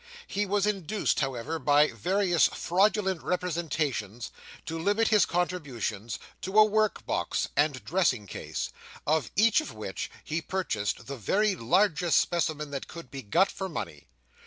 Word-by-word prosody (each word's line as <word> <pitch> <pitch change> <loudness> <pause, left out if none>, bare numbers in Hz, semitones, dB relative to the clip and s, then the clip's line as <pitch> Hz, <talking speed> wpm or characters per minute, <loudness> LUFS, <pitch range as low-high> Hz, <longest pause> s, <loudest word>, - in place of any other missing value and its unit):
He 205 +1 -2
was 200 +1 +1
induced, 205 0 0
however, 135 +3 -2
by 150 0 +4
various 185 -2 +2
fraudulent 190 0 +1
representations, 155 - -2 0.3
to 165 0 -4
limit 205 +6 +2
his 210 -2 +4
contributions 135 - -2 0.2
to 190 +3 -2
a 215 - +9
work 215 0 +1
box - - -1
and 145 -2 +1
dressing 165 - +1
case, - - -5 0.3
of 155 -4 +1
each 225 - +5
of 310 - -8
which - - -5
he 160 +2 -2
purchased 115 - -2
the 140 0 -6
very 200 - +1
largest 175 - +2
specimen 155 -3 0
that 140 -1 -5
could 170 0 -10
be 135 -1 -6
got 170 - +2
for 190 -1 -5
money. 75 - -6
170 Hz, 145 wpm, -28 LUFS, 140-195 Hz, 0.3 s, a